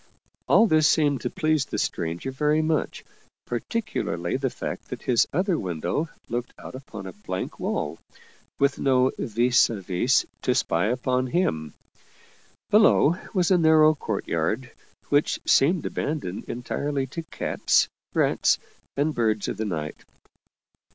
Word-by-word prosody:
All -, -, +6 dB
this 155 Hz, -7 st, +4 dB
seemed 145 Hz, -6 st, +2 dB
to -, -, -2 dB
please 155 Hz, -6 st, +1 dB
the -, -, -5 dB
stranger 85 Hz, +10 st, -2 dB
very 150 Hz, +3 st, +1 dB
much, 155 Hz, -1 st, -1 dB, 0.4 s
particu 215 Hz, -, -2 dB
larly 85 Hz, +8 st, -2 dB
the 135 Hz, -, +1 dB
fact -, -, -6 dB
that -, -, -7 dB
his 120 Hz, -3 st, +3 dB
other 185 Hz, +1 st, +1 dB
window 95 Hz, -, -2 dB, 0.2 s
looked 120 Hz, +1 st, -4 dB
out -, -, -10 dB
upon 115 Hz, -7 st, -9 dB
a 95 Hz, -, -7 dB
blank 95 Hz, -2 st, -5 dB
wall, -, -, -2 dB, 0.6 s
with 140 Hz, 0 st, +1 dB
no 130 Hz, -1 st, +3 dB
vis 120 Hz, +3 st, +3 dB
a 115 Hz, -3 st, -4 dB
vis 95 Hz, +8 st, +1 dB, 0.2 s
to 125 Hz, -, +1 dB
spy 90 Hz, -7 st, +1 dB
upon 125 Hz, +2 st, 0 dB
him. 80 Hz, -, -1 dB, 1.0 s
Below 205 Hz, -6 st, +5 dB, 0.2 s
was 180 Hz, -1 st, +2 dB
a 180 Hz, -, +5 dB
narrow 155 Hz, -1 st, +6 dB
courtyard, 110 Hz, -, -2 dB, 0.4 s
which 145 Hz, +1 st, +2 dB
seemed 160 Hz, +4 st, +3 dB
abandoned 140 Hz, -, -3 dB
entirely 135 Hz, +3 st, -3 dB
to 145 Hz, +6 st, -6 dB
cats, 165 Hz, -, +1 dB, 0.3 s
rats, -, -, +3 dB, 0.4 s
and 150 Hz, +2 st, +1 dB
birds 110 Hz, -4 st, 0 dB
of -, -, -3 dB
the 110 Hz, -, -2 dB
night. 80 Hz, -6 st, -4 dB
130 Hz, 140 wpm, -25 LUFS, 105-155 Hz, 1.0 s, All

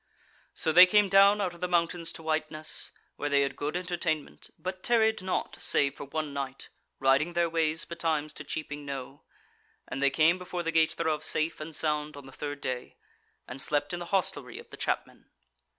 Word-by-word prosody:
So 160 Hz, -, +1 dB
they 180 Hz, +3 st, +9 dB
came 205 Hz, +1 st, +4 dB
down 200 Hz, +2 st, +6 dB
out 185 Hz, -4 st, -1 dB
of 170 Hz, -, -15 dB
the 180 Hz, -, 0 dB
mountains 170 Hz, -1 st, 0 dB
to 165 Hz, -, -10 dB
Whiteness, 155 Hz, 0 st, -1 dB, 0.3 s
where 145 Hz, -, -2 dB
they 140 Hz, 0 st, +4 dB
had 140 Hz, -, -1 dB
good 150 Hz, +4 st, -2 dB
entertainment, 170 Hz, -4 st, -3 dB
but 185 Hz, 0 st, -5 dB
tarried 220 Hz, -2 st, +2 dB
not 185 Hz, 0 st, -2 dB
save 140 Hz, -1 st, +3 dB
for -, -, -7 dB
one 150 Hz, +1 st, -4 dB
night, 135 Hz, -1 st, -5 dB, 0.3 s
riding 135 Hz, +6 st, +2 dB
their 170 Hz, 0 st, +2 dB
ways 160 Hz, -1 st, +1 dB
betimes 160 Hz, -3 st, -2 dB
to -, -, -8 dB
Cheaping 145 Hz, -2 st, -5 dB
Knowe: 135 Hz, 0 st, -7 dB, 0.7 s
and 135 Hz, -, -5 dB
they 140 Hz, -, +5 dB
came 160 Hz, +6 st, +3 dB
before 180 Hz, -1 st, -4 dB
the 165 Hz, -, -1 dB
gate 160 Hz, -1 st, +3 dB
thereof 155 Hz, -2 st, -1 dB
safe 155 Hz, +1 st, +1 dB
and 155 Hz, 0 st, -6 dB
sound 150 Hz, -1 st, -1 dB
on 140 Hz, -, -10 dB
the 135 Hz, -, -12 dB
third 145 Hz, +1 st, -6 dB
day; 125 Hz, -1 st, -4 dB, 0.5 s
and 130 Hz, +2 st, -7 dB
slept 145 Hz, +2 st, 0 dB
in 175 Hz, -, -3 dB
the 175 Hz, -, -5 dB
hostelry 190 Hz, 0 st, -1 dB
of -, -, -12 dB
the -, -, -8 dB
chapmen. -, -, -3 dB
160 Hz, 195 wpm, -29 LUFS, 145-175 Hz, 0.7 s, they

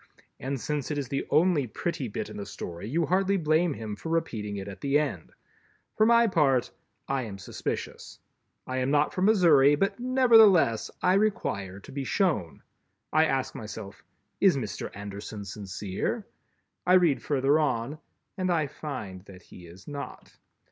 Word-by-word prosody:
and 135 Hz, +1 st, -3 dB
since 150 Hz, +1 st, -3 dB
it 150 Hz, -, -2 dB
is 140 Hz, -3 st, -3 dB
the 135 Hz, -, -2 dB
only 160 Hz, -5 st, +3 dB
pretty 140 Hz, +2 st, -3 dB
bit 105 Hz, -, -4 dB
in -, -, -10 dB
the 100 Hz, -, -5 dB
Story, 85 Hz, +5 st, -7 dB
you 165 Hz, +5 st, +1 dB
hardly 195 Hz, +5 st, +2 dB
blame 160 Hz, -1 st, +2 dB
him 110 Hz, -2 st, -5 dB
for 160 Hz, -, -7 dB
repeating 110 Hz, -11 st, -2 dB
it 100 Hz, 0 st, -6 dB
at 95 Hz, -1 st, -9 dB
the 140 Hz, +1 st, +2 dB
end. 140 Hz, -, -3 dB, 0.6 s
For 215 Hz, -, +4 dB
my 235 Hz, 0 st, +6 dB
part, 145 Hz, -, +2 dB, 0.4 s
I 135 Hz, -1 st, 0 dB
am 105 Hz, -5 st, -6 dB
suspicious; 90 Hz, -, -5 dB, 0.5 s
I 130 Hz, -, -3 dB
am 130 Hz, +1 st, 0 dB
not 145 Hz, +1 st, +2 dB
from 185 Hz, -, +1 dB
Missouri, 160 Hz, -9 st, +6 dB
but, 195 Hz, +9 st, -1 dB
nevertheless, 225 Hz, -, +5 dB
I 180 Hz, -, +4 dB
require 150 Hz, -, 0 dB
to -, -, -12 dB
be 140 Hz, 0 st, -4 dB
shown. 145 Hz, -, -1 dB, 0.5 s
I 155 Hz, +1 st, +5 dB
ask 135 Hz, -3 st, -1 dB
myself: 105 Hz, -2 st, -8 dB, 0.4 s
"Is -, -, +5 dB
Mr. -, -, -4 dB
Anderson 100 Hz, +1 st, -7 dB
sincere?" 95 Hz, -1 st, -4 dB, 0.6 s
I 180 Hz, -, +3 dB
read 175 Hz, -6 st, +4 dB
further 140 Hz, +1 st, +2 dB
on, 145 Hz, 0 st, -1 dB, 0.4 s
and 185 Hz, 0 st, 0 dB
I 165 Hz, -3 st, +2 dB
find 120 Hz, -10 st, -7 dB
that 95 Hz, -3 st, -13 dB
he 90 Hz, -1 st, -13 dB
is 90 Hz, +3 st, -15 dB
not. 145 Hz, -1 st, -8 dB
140 Hz, 165 wpm, -27 LUFS, 105-170 Hz, 0.6 s, my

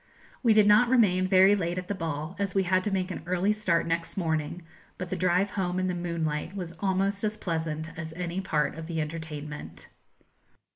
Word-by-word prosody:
We 230 Hz, -4 st, +4 dB
did 215 Hz, -1 st, +6 dB
not 210 Hz, +4 st, +6 dB
remain 190 Hz, -7 st, +4 dB
very 190 Hz, +1 st, +6 dB
late 175 Hz, -2 st, -2 dB
at 180 Hz, 0 st, -4 dB
the 205 Hz, -, -1 dB
ball, 160 Hz, -2 st, -4 dB
as 200 Hz, -2 st, -2 dB
we 195 Hz, -, +3 dB
had 185 Hz, +1 st, +2 dB
to -, -, +1 dB
make 190 Hz, -1 st, -1 dB
an -, -, -5 dB
early 185 Hz, +3 st, +2 dB
start 190 Hz, -6 st, +1 dB
next 165 Hz, +2 st, -2 dB
morning; 160 Hz, -1 st, -1 dB, 0.3 s
but 185 Hz, -1 st, -6 dB
the -, -, 0 dB
drive 185 Hz, +2 st, +2 dB
home 180 Hz, -2 st, -1 dB
in 185 Hz, -, 0 dB
the 185 Hz, -, 0 dB
moonlight 170 Hz, -1 st, -2 dB
was 175 Hz, -4 st, -5 dB
almost 195 Hz, +2 st, 0 dB
as 215 Hz, 0 st, -1 dB
pleasant 160 Hz, -3 st, -3 dB
as 160 Hz, -1 st, -6 dB
any 175 Hz, +2 st, -3 dB
part 155 Hz, -6 st, 0 dB
of 160 Hz, 0 st, -7 dB
the 165 Hz, -2 st, -3 dB
entertainment. 150 Hz, -, -6 dB
180 Hz, 200 wpm, -28 LUFS, 165-195 Hz, 0.3 s, did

